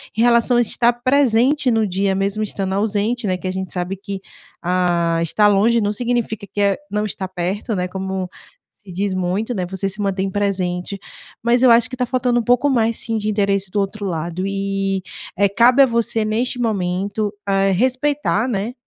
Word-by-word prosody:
em 220 Hz, -, 0 dB
relação 240 Hz, +1 st, +4 dB
a -, -, +5 dB
estar 235 Hz, +1 st, +2 dB
presente 255 Hz, +1 st, +2 dB
no 225 Hz, -2 st, +2 dB
dia, 195 Hz, +1 st, 0 dB
mesmo 200 Hz, +2 st, -1 dB
estando 195 Hz, -2 st, -3 dB
ausente, 215 Hz, +3 st, 0 dB
né. 185 Hz, -2 st, 0 dB
Que 185 Hz, -, -6 dB
a -, -, -1 dB
gente 190 Hz, 0 st, -5 dB
sabe 180 Hz, +1 st, -3 dB
que, 195 Hz, 0 st, -6 dB, 0.4 s
ah, 175 Hz, -2 st, +1 dB
estar 210 Hz, +6 st, +3 dB
longe 215 Hz, +3 st, +3 dB
não 205 Hz, +1 st, 0 dB
significa 235 Hz, -2 st, -2 dB
que, -, -, -4 dB
eh, 200 Hz, -1 st, +2 dB
não 210 Hz, +1 st, 0 dB
estar 190 Hz, -2 st, -4 dB
perto, 190 Hz, +5 st, -3 dB
né, 180 Hz, -1 st, -1 dB
como 190 Hz, 0 st, -4 dB, 0.4 s
se 200 Hz, -4 st, -15 dB
diz 195 Hz, +2 st, -1 dB
muito, 185 Hz, +6 st, -1 dB
né, 185 Hz, -3 st, -2 dB
você 190 Hz, +2 st, -3 dB
se 200 Hz, +2 st, -5 dB
mantém 195 Hz, -1 st, -1 dB
presente. 190 Hz, -1 st, -2 dB, 0.4 s
Mas 235 Hz, +2 st, +2 dB
eu 255 Hz, -, +7 dB
acho 230 Hz, +1 st, +5 dB
que 255 Hz, -, -6 dB
tá 250 Hz, -, 0 dB
faltando 245 Hz, 0 st, +1 dB
um -, -, -7 dB
pouco 245 Hz, +4 st, +3 dB
mais, 230 Hz, -4 st, +1 dB
sim, 225 Hz, -1 st, -3 dB
de 215 Hz, 0 st, -2 dB
interesse 200 Hz, -2 st, 0 dB
do 205 Hz, -, 0 dB
outro 200 Hz, +1 st, -3 dB
lado 175 Hz, 0 st, -3 dB
e, 195 Hz, -1 st, -1 dB, 0.4 s
eh, 200 Hz, -, +4 dB
cabe 240 Hz, +6 st, +5 dB
a -, -, +6 dB
você 230 Hz, -2 st, 0 dB
neste 240 Hz, +4 st, -1 dB
momento, 200 Hz, -1 st, -1 dB
eh, 195 Hz, 0 st, +2 dB
respeitar, 255 Hz, +2 st, +1 dB
né. 215 Hz, +2 st, -2 dB
205 Hz, 195 wpm, -20 LUFS, 190-235 Hz, 0.4 s, eu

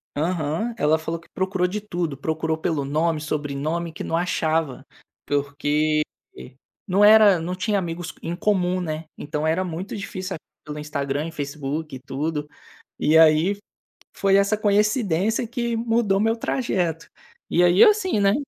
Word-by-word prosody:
Aham, 165 Hz, +7 st, -1 dB
ela 155 Hz, -2 st, +3 dB
falou 165 Hz, +1 st, -4 dB
que 170 Hz, -, -22 dB
procurou 185 Hz, -1 st, 0 dB
de 210 Hz, +3 st, -3 dB
tudo, 175 Hz, -8 st, -3 dB
procurou 160 Hz, +2 st, -2 dB
pelo 160 Hz, -3 st, -1 dB
nome, 155 Hz, +3 st, 0 dB
sobrenome, 155 Hz, +2 st, -3 dB
que -, -, -6 dB
não 165 Hz, -, -1 dB
achava, 160 Hz, -5 st, -1 dB, 0.4 s
porque, 145 Hz, +2 st, +1 dB, 0.4 s
eh, 65 Hz, -, -11 dB, 0.3 s
não 195 Hz, +3 st, +3 dB
era 210 Hz, -3 st, +7 dB
não 170 Hz, +3 st, -3 dB
tinha 205 Hz, +2 st, 0 dB
amigos 175 Hz, -2 st, -4 dB
em 170 Hz, +1 st, -3 dB
comum, 185 Hz, -2 st, +1 dB
né. 155 Hz, -1 st, -4 dB
Então 150 Hz, +1 st, -3 dB
era 165 Hz, +4 st, +1 dB
muito 180 Hz, +3 st, -5 dB
difícil 190 Hz, -2 st, -5 dB, 0.3 s
pelo 150 Hz, 0 st, -6 dB
Instagram 145 Hz, 0 st, -3 dB
e 165 Hz, -, -7 dB
Facebook 150 Hz, 0 st, -4 dB
e -, -, -8 dB
tudo 150 Hz, +3 st, -3 dB, 0.5 s
e 155 Hz, +2 st, +3 dB
aí, 160 Hz, +4 st, +5 dB
f 205 Hz, -, -9 dB, 0.5 s
foi 195 Hz, 0 st, +2 dB
essa 200 Hz, +2 st, +3 dB
coincidência 210 Hz, 0 st, +1 dB
que 235 Hz, 0 st, -2 dB
mudou 225 Hz, -3 st, +1 dB
meu 225 Hz, +2 st, +2 dB
trajeto. 180 Hz, -, -1 dB, 0.4 s
E 175 Hz, -, +3 dB
aí 175 Hz, +2 st, +6 dB
assim, 410 Hz, -, +3 dB
né 200 Hz, 0 st, +4 dB
170 Hz, 155 wpm, -23 LUFS, 155-200 Hz, 0.5 s, era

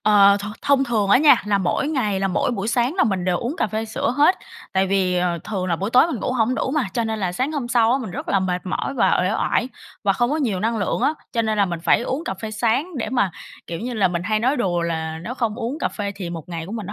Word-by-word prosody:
Ờ, 200 Hz, -1 st, +6 dB
th 205 Hz, -, -5 dB, 0.2 s
thông 275 Hz, -1 st, +3 dB
thường 220 Hz, -5 st, 0 dB
á 225 Hz, -, +7 dB
nha, 300 Hz, 0 st, +6 dB
là 205 Hz, -1 st, +2 dB
mỗi 190 Hz, +9 st, 0 dB
ngày 215 Hz, -10 st, 0 dB
là 195 Hz, -, +1 dB
mỗi 180 Hz, -, 0 dB
buổi 215 Hz, -3 st, -3 dB
sáng 240 Hz, +5 st, +1 dB
là 380 Hz, -, +3 dB
mình 190 Hz, -5 st, -1 dB
đều 180 Hz, -1 st, +1 dB
uống 250 Hz, +7 st, -3 dB
cà -, -, +1 dB
phê 220 Hz, +1 st, -3 dB
sữa 220 Hz, +1 st, -2 dB
hết, 300 Hz, +6 st, +5 dB, 0.4 s
tại 190 Hz, 0 st, +2 dB
vì, 185 Hz, -2 st, +1 dB
ờ, 175 Hz, -1 st, 0 dB
thường 190 Hz, -4 st, -3 dB
là 170 Hz, -2 st, 0 dB
buổi 195 Hz, +6 st, -3 dB
tối 255 Hz, +6 st, +6 dB
mình 285 Hz, -11 st, -4 dB
ngủ -, -, -1 dB
hổng 245 Hz, 0 st, +1 dB
đủ 265 Hz, -, -1 dB
mà, 285 Hz, -4 st, 0 dB
cho 235 Hz, -, 0 dB
nên 220 Hz, -1 st, -2 dB
là 185 Hz, -3 st, -1 dB
sáng 260 Hz, -, -1 dB
hôm 275 Hz, -6 st, -3 dB
sau 235 Hz, -2 st, +3 dB
á 265 Hz, -, +2 dB
mình 230 Hz, -7 st, -6 dB
rất -, -, -6 dB
là 195 Hz, -, +2 dB
mệt 180 Hz, 0 st, -2 dB
mỏi 185 Hz, +8 st, -2 dB
và 250 Hz, -, +3 dB
uể 185 Hz, -, +1 dB
oải 240 Hz, +2 st, 0 dB, 0.4 s
và 195 Hz, -, +4 dB
không 240 Hz, +5 st, 0 dB
có 300 Hz, -, +1 dB
nhiều 230 Hz, -12 st, -1 dB
năng 225 Hz, +3 st, 0 dB
lượng 200 Hz, -, -1 dB
á. 305 Hz, -, +2 dB, 0.2 s
Cho 230 Hz, -, +1 dB
nên 220 Hz, -1 st, -1 dB
là 200 Hz, -, +5 dB
mình 170 Hz, -2 st, -4 dB
phải 165 Hz, -, +3 dB
uống 265 Hz, +6 st, -3 dB
cà 190 Hz, -, -3 dB
phê 215 Hz, +3 st, -6 dB
sáng 240 Hz, +10 st, 0 dB
để 240 Hz, -, -2 dB
mà, 245 Hz, -7 st, +1 dB, 0.4 s
kiểu 170 Hz, -, -5 dB
như 245 Hz, +2 st, -4 dB
là, 200 Hz, -4 st, +3 dB
mình 175 Hz, -1 st, -2 dB
hay 215 Hz, +3 st, 0 dB
nói 260 Hz, +5 st, +2 dB
đùa 180 Hz, -7 st, 0 dB
là 160 Hz, -1 st, -3 dB
nếu 235 Hz, +8 st, -5 dB
không 230 Hz, -5 st, -1 dB
uống 245 Hz, +5 st, -4 dB
cà -, -, 0 dB
phê 200 Hz, -1 st, -4 dB
thì 180 Hz, -4 st, -5 dB
một 165 Hz, -2 st, -7 dB
ngày 165 Hz, -2 st, -5 dB
của 195 Hz, -, -8 dB
mình 220 Hz, -4 st, -5 dB
nó 205 Hz, -, -6 dB
215 Hz, 300 wpm, -22 LUFS, 185-250 Hz, 0.4 s, á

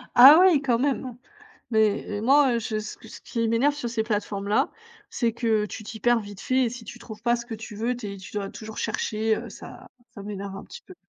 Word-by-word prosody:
Ah, 270 Hz, +5 st, +11 dB
oui, 360 Hz, -7 st, +5 dB
quand 245 Hz, -4 st, +1 dB
même! 260 Hz, -2 st, -1 dB, 0.5 s
Mais 220 Hz, -2 st, +3 dB, 0.2 s
et -, -, -3 dB
moi, 270 Hz, +3 st, +4 dB
heu, -, -, +1 dB
je 220 Hz, -1 st, -3 dB
ce 215 Hz, 0 st, -6 dB
qui 225 Hz, -, -14 dB
ce -, -, -11 dB
qui 230 Hz, -1 st, -2 dB
m'énerve 250 Hz, +6 st, +2 dB
sur 290 Hz, -5 st, -4 dB
ces 230 Hz, -1 st, -1 dB
plateformes-là, 210 Hz, +2 st, -1 dB, 0.4 s
c'est 235 Hz, -2 st, 0 dB
que 220 Hz, -2 st, +1 dB
tu 210 Hz, -, -7 dB
t'y 220 Hz, +1 st, -8 dB
perds 240 Hz, +2 st, +3 dB
vite 205 Hz, -1 st, -10 dB
fait 260 Hz, 0 st, +2 dB
et 235 Hz, -, -1 dB
si 240 Hz, -1 st, -9 dB
tu 240 Hz, -, -10 dB
trouves 220 Hz, -2 st, -11 dB
pas 240 Hz, 0 st, +2 dB
ce 235 Hz, 0 st, -8 dB
que 230 Hz, -, -5 dB
tu 220 Hz, -1 st, -9 dB
veux, 235 Hz, +4 st, -1 dB
tu 210 Hz, -5 st, -6 dB
es -, -, -8 dB
tu 190 Hz, -, -11 dB
dois 200 Hz, -1 st, -3 dB
toujours 220 Hz, 0 st, -9 dB
chercher, 220 Hz, 0 st, 0 dB
heu, 235 Hz, -, -6 dB
ça 200 Hz, -, -11 dB, 0.3 s
ça 200 Hz, -, -9 dB
m'énerve 200 Hz, -1 st, -6 dB
un -, -, -8 dB
petit 480 Hz, -, -11 dB
peu. 370 Hz, -, -14 dB
225 Hz, 250 wpm, -25 LUFS, 210-245 Hz, 0.5 s, Ah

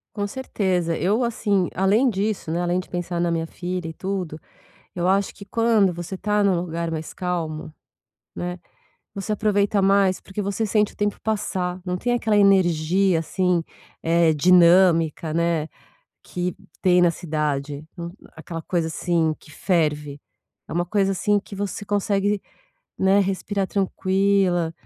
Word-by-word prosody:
Com 205 Hz, -1 st, -1 dB
certeza 190 Hz, -8 st, -1 dB
eu 210 Hz, +9 st, +1 dB
assim 205 Hz, -5 st, 0 dB
além 200 Hz, +8 st, +3 dB
disso, 205 Hz, -5 st, -1 dB
né. 170 Hz, +2 st, 0 dB
Além 175 Hz, +1 st, 0 dB
de 185 Hz, -, -7 dB
pensar 175 Hz, -1 st, -3 dB
na 170 Hz, 0 st, +1 dB
minha 165 Hz, -1 st, -1 dB
filha 180 Hz, 0 st, -4 dB
e 160 Hz, -, -6 dB
tudo, 185 Hz, -4 st, -4 dB, 0.6 s
eu 175 Hz, 0 st, 0 dB
acho 195 Hz, +1 st, +2 dB
que 200 Hz, -, -11 dB
quando 215 Hz, -3 st, +2 dB
você 175 Hz, +2 st, -6 dB
tá 210 Hz, +1 st, +1 dB
num 195 Hz, -2 st, +3 dB
lugar 170 Hz, -1 st, -3 dB
mais 160 Hz, -1 st, -5 dB
calmo, 165 Hz, -4 st, -3 dB, 0.6 s
né. 180 Hz, 0 st, -4 dB, 0.6 s
Você 200 Hz, +2 st, -4 dB
aproveita 205 Hz, -1 st, +1 dB
mais, 195 Hz, -1 st, +3 dB
porque 195 Hz, +2 st, -6 dB
você 200 Hz, +3 st, -1 dB
sente 210 Hz, 0 st, +1 dB
o -, -, -23 dB
tempo 205 Hz, 0 st, -2 dB
passar. 185 Hz, -4 st, -2 dB
Não 180 Hz, -1 st, -1 dB
tem 245 Hz, +6 st, 0 dB
aquela 225 Hz, -3 st, +1 dB
energia 185 Hz, -2 st, +3 dB
assim, 180 Hz, +1 st, 0 dB, 0.4 s
é, 165 Hz, -1 st, +3 dB
dinâmica, 170 Hz, -1 st, +4 dB
né. 170 Hz, -2 st, +1 dB, 0.6 s
Que 180 Hz, 0 st, -3 dB, 0.3 s
tem 180 Hz, -1 st, +4 dB
na 175 Hz, -, +5 dB
cidade, 150 Hz, -3 st, -3 dB, 0.5 s
aquela 165 Hz, +1 st, -7 dB
coisa, 170 Hz, 0 st, -1 dB
assim, 160 Hz, 0 st, 0 dB
que -, -, -17 dB
ferve 150 Hz, -4 st, -1 dB, 0.5 s
é -, -, -7 dB
uma 175 Hz, +1 st, 0 dB
coisa 195 Hz, +1 st, +1 dB
assim 205 Hz, +2 st, +1 dB
que 200 Hz, -, -11 dB
você 205 Hz, 0 st, -4 dB
consegue, 205 Hz, 0 st, 0 dB, 0.6 s
né, 190 Hz, +1 st, +4 dB
respirar 195 Hz, 0 st, -1 dB
tranquila, 190 Hz, -3 st, +1 dB
185 Hz, 150 wpm, -23 LUFS, 170-200 Hz, 0.6 s, na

